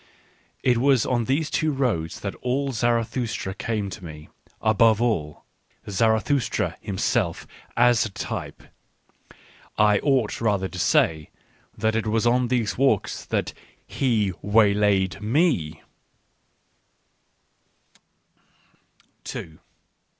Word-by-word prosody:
It 125 Hz, -2 st, +3 dB
was 135 Hz, -2 st, +3 dB
on 120 Hz, -3 st, 0 dB
these 145 Hz, +5 st, 0 dB
two 155 Hz, -1 st, +1 dB
roads 115 Hz, -, -2 dB
that 100 Hz, -, -4 dB
all 135 Hz, +2 st, -1 dB
Zarathustra 115 Hz, -3 st, -1 dB
came 105 Hz, 0 st, -3 dB
to 90 Hz, -, -9 dB
me, 75 Hz, -2 st, -10 dB, 0.3 s
above 110 Hz, 0 st, +3 dB
all, 95 Hz, -11 st, -1 dB, 0.4 s
Zarathustra 110 Hz, +5 st, +1 dB
himself 100 Hz, -2 st, -1 dB, 0.3 s
as 120 Hz, -1 st, +4 dB
a 110 Hz, -, -3 dB
type 95 Hz, -, -6 dB, 0.6 s
— -, -, -20 dB, 0.4 s
I 105 Hz, -1 st, +4 dB
ought 130 Hz, -8 st, 0 dB
rather 100 Hz, -4 st, +1 dB
to 90 Hz, -, -8 dB
say 80 Hz, -2 st, +2 dB, 0.5 s
that 110 Hz, 0 st, 0 dB
it 115 Hz, -1 st, -1 dB
was 110 Hz, +1 st, +1 dB
on 125 Hz, +1 st, +3 dB
these 120 Hz, -3 st, -1 dB
walks 130 Hz, -8 st, +1 dB
that -, -, -2 dB, 0.3 s
he 110 Hz, -7 st, 0 dB
waylaid 100 Hz, -2 st, +2 dB
me. 110 Hz, -, 0 dB
110 Hz, 105 wpm, -24 LUFS, 100-125 Hz, 0.6 s, as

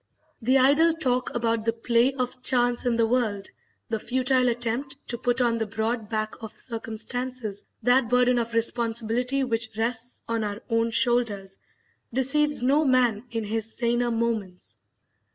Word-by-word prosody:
The 255 Hz, +4 st, +3 dB
idle 290 Hz, +6 st, +5 dB
talk 255 Hz, -6 st, 0 dB
about 230 Hz, -1 st, 0 dB
the 230 Hz, 0 st, 0 dB
play 235 Hz, +2 st, +2 dB
of 255 Hz, -1 st, -4 dB
chance 245 Hz, -1 st, +2 dB
in 240 Hz, -, +2 dB
the 230 Hz, 0 st, +3 dB
world, 220 Hz, -5 st, 0 dB, 0.4 s
the 225 Hz, -1 st, -2 dB
futile 255 Hz, +1 st, +2 dB
attempt 240 Hz, +4 st, -1 dB
to 240 Hz, -, -3 dB
put 245 Hz, 0 st, 0 dB
on 235 Hz, -1 st, +2 dB
the 225 Hz, -, -1 dB
broad 220 Hz, +1 st, -2 dB
back 215 Hz, 0 st, -3 dB
of 220 Hz, -2 st, -9 dB
circumstances 230 Hz, -1 st, -4 dB, 0.2 s
that 245 Hz, 0 st, +3 dB
burden 250 Hz, 0 st, +3 dB
of 230 Hz, 0 st, -3 dB
responsibility 235 Hz, +3 st, +1 dB
which 230 Hz, -3 st, -1 dB
rests 230 Hz, +1 st, -1 dB
on 230 Hz, -1 st, -1 dB
our 205 Hz, 0 st, -4 dB
own 230 Hz, 0 st, +2 dB
shoulders, 225 Hz, -5 st, 0 dB, 0.5 s
deceives 275 Hz, +3 st, +1 dB
no 280 Hz, +5 st, +3 dB
man 250 Hz, -5 st, +2 dB
in 230 Hz, -1 st, -3 dB
his 220 Hz, +1 st, -3 dB
saner 240 Hz, 0 st, +1 dB
moments. 225 Hz, -6 st, -3 dB
235 Hz, 155 wpm, -25 LUFS, 225-250 Hz, 0.5 s, idle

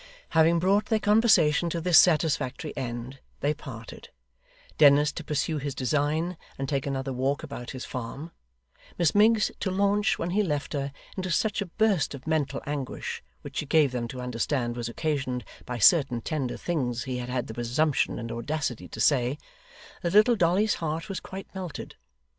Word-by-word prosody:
Having 160 Hz, +1 st, +4 dB
brought 195 Hz, +4 st, +2 dB
their 220 Hz, -, +1 dB
conversation 205 Hz, -7 st, +4 dB
to 170 Hz, -, -2 dB
this 170 Hz, 0 st, +6 dB
satisfactory 150 Hz, -3 st, +1 dB
end, 125 Hz, +1 st, -5 dB, 0.2 s
they 145 Hz, +2 st, +2 dB
parted: 115 Hz, -6 st, -10 dB, 0.7 s
Dennis, 145 Hz, 0 st, +6 dB
to -, -, -7 dB
pursue 150 Hz, +1 st, -1 dB
his 140 Hz, -1 st, -4 dB
design, 150 Hz, +6 st, 0 dB, 0.2 s
and 135 Hz, -, -3 dB
take 140 Hz, 0 st, -1 dB
another 135 Hz, -1 st, -2 dB
walk 135 Hz, +4 st, -1 dB
about 140 Hz, -5 st, -7 dB
his 130 Hz, -2 st, -6 dB
farm; 130 Hz, +6 st, -6 dB, 0.7 s
Miss 170 Hz, -3 st, +2 dB
Miggs, 215 Hz, +1 st, +4 dB
to 190 Hz, -, -1 dB
launch, 200 Hz, +2 st, +2 dB
when 170 Hz, +1 st, -3 dB
he 210 Hz, +3 st, +2 dB
left 150 Hz, -7 st, -2 dB
her, 140 Hz, -1 st, -2 dB, 0.2 s
into 185 Hz, -1 st, -3 dB
such 210 Hz, +5 st, +1 dB
a 200 Hz, -, -3 dB
burst 195 Hz, -5 st, +1 dB
of 135 Hz, -, -12 dB
mental 150 Hz, -3 st, -1 dB
anguish 140 Hz, -3 st, -4 dB, 0.2 s
(which -, -, -8 dB
she 150 Hz, -, -2 dB
gave 150 Hz, -3 st, +4 dB
them 120 Hz, -2 st, -3 dB
to 125 Hz, +2 st, -7 dB
understand 125 Hz, 0 st, -1 dB
was 120 Hz, -1 st, -3 dB
occasioned 140 Hz, -2 st, -2 dB, 0.2 s
by 125 Hz, -, -3 dB
certain 130 Hz, -, +5 dB
tender 130 Hz, +1 st, -3 dB
things 125 Hz, -9 st, -2 dB
he 130 Hz, -2 st, -3 dB
had 125 Hz, 0 st, -5 dB
had 125 Hz, -1 st, -1 dB
the 110 Hz, -, -7 dB
presumption 125 Hz, +6 st, 0 dB
and 115 Hz, 0 st, -5 dB
audacity 120 Hz, -5 st, -3 dB
to 110 Hz, -, -9 dB
say), 125 Hz, +2 st, +2 dB, 0.6 s
that 170 Hz, 0 st, -1 dB
little 215 Hz, +4 st, +6 dB
Dolly's 195 Hz, +3 st, +2 dB
heart 160 Hz, +2 st, -3 dB
was 195 Hz, -, -3 dB
quite 190 Hz, +1 st, -8 dB
melted. 185 Hz, -5 st, -6 dB
150 Hz, 175 wpm, -27 LUFS, 130-175 Hz, 0.7 s, this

